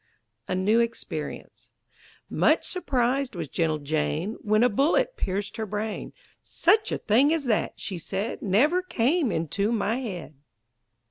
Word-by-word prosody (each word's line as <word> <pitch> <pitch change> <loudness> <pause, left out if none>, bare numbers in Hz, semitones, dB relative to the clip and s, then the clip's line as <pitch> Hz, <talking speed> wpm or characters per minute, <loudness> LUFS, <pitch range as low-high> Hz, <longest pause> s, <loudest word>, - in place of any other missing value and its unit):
A - - -1
NEW 205 +5 +3
EXPERIENCE 230 0 -4 0.6
Much - - +2
surprised 265 - 0
was 165 -3 -4
gentle 160 +1 0
Jane 155 +7 -1
When 215 +1 +3
a - - +6
bullet 315 - +2
pierced 195 +1 -3
her 220 - -2
brain; 210 +2 -4 0.3
"Such 415 +6 +2
a - - 0
thing 255 +8 +3
as 320 -3 0
that," 225 -4 0
she 185 -4 -4
said, 195 +6 -4
"Never 270 - +3
came 310 - +1
into 200 +7 -1
my 225 0 0
head!" 190 -11 -6
220 Hz, 140 wpm, -26 LUFS, 190-270 Hz, 0.6 s, a